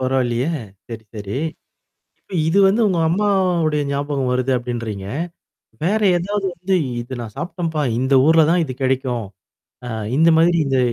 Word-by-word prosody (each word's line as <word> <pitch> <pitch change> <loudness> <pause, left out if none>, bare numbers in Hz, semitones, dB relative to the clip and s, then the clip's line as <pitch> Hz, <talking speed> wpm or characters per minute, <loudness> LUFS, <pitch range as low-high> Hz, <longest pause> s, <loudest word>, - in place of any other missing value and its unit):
பரவால்லையே! 130 -1 0 0.4
சரி, 115 -1 -8
சரி. 100 0 -5 0.8
இப்ப - - -21 0.2
இது 190 +5 +2
வந்து 205 +5 +3
உங்க 180 -3 0
அம்மாவுடைய 180 -5 +1
ஞாபகம் 140 -2 -1
வருது 130 +1 0
அப்டின்றீங்க. 115 -5 -4 0.8
வேற 210 +5 +1 0.2
ஏதாவது 195 +3 -2
வந்து 185 +3 -1 0.3
இது 120 +2 -6
நான் 110 -3 -8
சாப்பிட்டம்ப்பா, 165 -2 -3 0.2
இந்த 130 +2 +1
ஊர்ல 160 0 +6
தான் 175 0 +3
இது 130 -4 -6
கிடைக்கும். 130 -4 0 0.6
அ - - -4 0.3
இந்த 165 +2 +5
மாதிரி 170 +1 +4
இந்த 135 -1 +1
145 Hz, 145 wpm, -20 LUFS, 125-175 Hz, 0.8 s, ஊர்ல